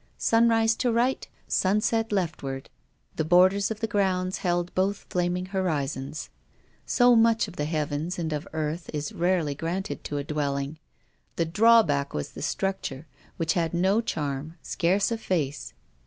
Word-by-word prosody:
Sunrise 225 -1 +3
to 245 - +1
right, 240 +3 +1 0.2
sunset 215 +3 +1
leftward, 150 -8 -3 0.5
the 155 - +1
borders 185 +4 +4
of 220 0 -5
the 225 - 0
grounds 190 -3 0
held 175 -1 -1
both 195 +2 0
flaming 180 0 0
horizons. 155 -6 -3 0.6
So 245 -1 +5
much 225 -1 +4
of 185 - -11
the 150 - -2
heavens 155 +2 -2
and 160 -3 -2
of 150 0 -4
earth 160 +2 -3
is 150 0 -3
rarely 175 -4 +1
granted 165 +1 -4
to 145 - -3
a 140 - -2
dwelling. 140 0 -2 0.6
The 170 - +1
drawback 170 -7 +4
was 75 - -3
the - - -9
structure, 190 -7 -2 0.3
which 160 -1 +1
had 170 -1 0
no 190 +5 +3
charm, 150 -5 -3
scarce 190 +5 +1
a 230 - -1
face. 145 - -2
175 Hz, 150 wpm, -26 LUFS, 150-200 Hz, 0.6 s, So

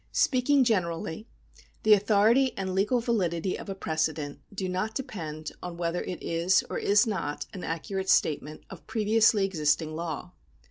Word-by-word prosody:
Speaking 270 +1 +3
generally, 180 -2 -1 0.6
the 215 - +7
authority 215 +6 +3
and 190 -1 -2
legal 210 +6 +2
validity 185 -6 0
of - - -8
a 195 - -3
precedent 155 -4 -2
do 195 -2 -3
not 185 +4 -2
depend 155 - -5
on 175 -1 -6
whether 170 0 -1
it 180 - -6
is, 170 +3 +2
or - - -2
is 205 +1 +4
not, 170 -9 -3
an 185 - -7
accurate 190 +4 -3
statement 155 0 +1
of 190 - -11
previously 220 -1 +3
existing 155 -3 0
law. 170 +1 -5
190 Hz, 150 wpm, -28 LUFS, 165-215 Hz, 0.6 s, the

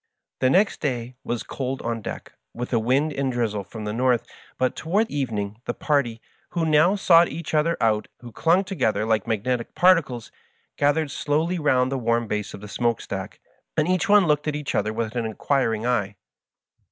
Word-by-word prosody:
The 130 - +3
next 195 +8 +3
day 125 -4 -2
was 120 -1 -3
cold 130 0 -4
on 115 -1 -2
deck, - - -7 0.2
with 125 - -5
a 115 - +4
wind 135 +7 +1
and 135 -1 -1
drizzle 110 -4 -1
from 105 +2 -8
the 105 - -3
north, 125 0 +2 0.3
but 130 0 0
toward 200 +8 0
evening 110 -6 -3
the - - -3
party, 135 -7 0 0.3
who 170 -2 0
now 155 +5 +4
sought 170 -3 +5
each 165 -1 -6
other 160 +2 +2
out 110 -2 +1
and 120 -2 -11
clung 175 +4 +3
together 110 - 0
like 110 -3 +1
magnetic 115 +2 -2
particles, 165 -11 +3 0.4
gathered 145 +1 +1
slowly 160 +6 0
round 130 -4 +2
the 135 - -1
warm 115 0 +1
base 105 -1 -3
of 100 - -12
the 105 - -8
smoke 115 +3 0
stack, - - -6 0.4
and 155 - +2
each 185 +4 +1
one 205 -2 +6
looked 150 -1 +1
at 150 - 0
the 150 0 -5
other 105 +1 0
with 110 +1 -3
an 115 -2 -1
inquiring 115 -1 0
eye. 105 -5 0
130 Hz, 190 wpm, -24 LUFS, 115-155 Hz, 0.4 s, one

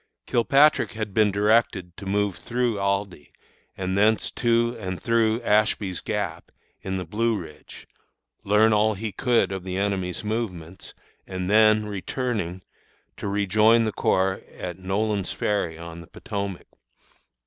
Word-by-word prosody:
Kilpatrick 140 +5 +3
had 110 -2 -5
been 105 0 +4
directed 100 -3 +1
to 100 - -8
move 100 -1 0
through 120 -3 -1
Aldie, 100 -5 -2 0.5
and 95 0 -2
thence 105 +2 +2
to 120 0 +1
and 95 -3 -4
through 115 -1 +2
Ashby's 105 -4 +1
Gap, 100 -6 -4 0.3
in 95 0 -3
the 90 - -4
Blue 110 +5 0
Ridge, 80 -5 -11 0.6
learn 105 +2 +4
all 105 0 +3
he 110 +2 -4
could 115 -2 +1
of 95 -2 -4
the 95 0 -4
enemy's 95 -2 -2
movements, 95 -6 -5 0.3
and, 95 0 -3
then 110 0 +5
returning, 105 -3 -3 0.5
to - - -5
rejoin 105 +3 +3
the 110 - 0
corps 95 -1 +1 0.2
at 90 0 -6
Nolan's 100 +1 -1
Ferry 95 -6 -1
on 85 0 -9
the 85 - -13
Potomac. 100 -1 -5
100 Hz, 135 wpm, -24 LUFS, 95-110 Hz, 0.6 s, then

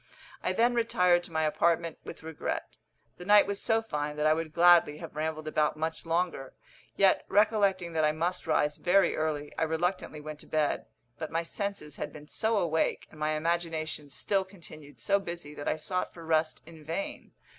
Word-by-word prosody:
I - - 0
then 235 +5 +3
retired 180 -7 +3
to - - -9
my 160 0 0
apartment 165 +1 +1
with - - -9
regret. 160 -1 -4 0.5
The 180 - -9
night 205 +1 +7
was 200 0 -3
so 225 0 +2
fine 150 -7 -3
that 150 0 -1
I 155 - +6
would 160 0 -3
gladly 170 -2 +5
have 165 -2 -9
rambled 155 0 -3
about 155 0 +1
much 160 +1 -3
longer, 165 -5 -1 0.4
yet, 195 -1 +4
recollecting 200 -5 +2
that 160 -1 +1
I 150 - +4
must 170 +4 -2
rise 150 0 +2
very 190 +2 +3
early, 150 -2 -2
I - - -2
reluctantly 160 0 -1
went 150 0 -8
to - - -13
bed; 155 -2 0 0.3
but 160 - -4
my 165 +1 -1
senses 185 -5 -4
had 150 - -4
been 150 0 -12
so 220 +6 0
awake, 160 -4 0
and 155 - -14
my 155 0 +1
imagination 160 -2 -2
still 195 +7 0
continued 165 -6 -13
so 200 0 +2
busy, 170 -5 -7
that 145 - -7
I - - +2
sought 180 +4 -2
for 165 -1 -10
rest 160 0 +1
in 160 -1 -13
vain. 165 +6 -5
165 Hz, 190 wpm, -29 LUFS, 155-180 Hz, 0.5 s, night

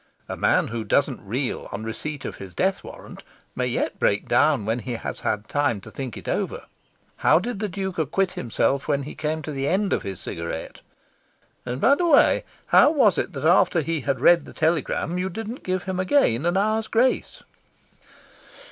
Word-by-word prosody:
A - - -4
man - - +2
who 115 -1 -3
doesn't 135 +1 +1
reel 120 +6 -3
on 110 - -5
receipt 140 +5 -5
of - - -6
his 95 -2 -10
death 190 +1 0
warrant - - -11 0.3
may - - -1
yet - - -2
break - - +1
down 105 - +3
when 115 +3 0
he 120 +2 -5
has 115 - -5
had 105 +1 -2
time 145 -7 0
to - - -12
think 130 -6 -6
it - - -11
over. - - -2 0.5
How - - +4
did 200 +4 -3
the 210 -1 -2
Duke 190 -1 -4
acquit 175 +5 0
himself 135 +3 -1
when 140 -2 0
he 145 - -7
came 155 +1 -3
to 155 - -5
the 135 -1 -2
end 195 +4 +1
of - - 0
his 95 -2 -6
cigarette? 85 -1 -6 0.9
And 125 +1 -3
by 275 - +5
the 345 +4 +1
way, 285 -4 +4 0.2
how - - +6
was 260 - +3
it - - -3
that 140 +1 -4
after 175 0 +4
he 160 0 -2
had 130 +1 -1
read 170 +6 +5
the - - -12
telegram 165 +1 0
you 185 +1 -1
didn't 225 +6 -6
give 185 0 -2
him 190 -1 -3
again 175 - +2
an 175 +2 +1
hour's 215 +2 +1
grace?" 240 +4 0
155 Hz, 195 wpm, -24 LUFS, 125-190 Hz, 0.9 s, how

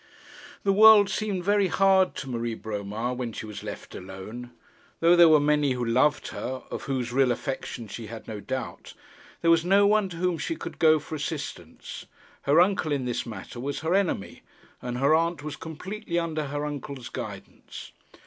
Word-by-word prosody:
The 195 - +3
world 215 0 +8
seemed 200 -4 -2
very 200 0 +3
hard 190 +1 +3
to 135 - -6
Marie 120 -2 -3
Bromar 110 +3 -4
when 125 -2 -4
she - - -6
was 105 -1 -8
left - - -8
alone. 95 +6 -8 0.5
Though 170 +1 +5
there 170 -1 +8
were 155 -1 +7
many 145 -2 +2
who 125 -1 -2
loved 130 +6 +2
her, 130 0 -5
of - - -5
whose 125 -3 -2
real 130 -1 +3
affection 120 -1 -4
she 110 +2 -7
had 115 +1 -9
no 110 -2 -5
doubt, 130 +3 -6 0.5
there 165 - +5
was 165 -1 +4
no 195 +3 +4
one 210 -1 +3
to 170 - -8
whom 180 -1 0
she 330 - -2
could - - -8
go 155 -1 +6
for 150 +1 -9
assistance. 145 - -6 0.3
Her 145 +4 +4
uncle 180 -3 +2
in 140 -3 0
this 120 0 -2
matter 110 +2 -8
was 140 +4 -3
her 160 +2 0
enemy, 190 - -1 0.4
and 125 0 -4
her 140 +4 +3
aunt 165 -2 +1
was 150 -1 -5
completely 180 +3 -5
under 160 -3 -1
her 145 +1 -3
uncle's 140 -3 -6
guidance. - - -8
145 Hz, 185 wpm, -26 LUFS, 120-175 Hz, 0.5 s, world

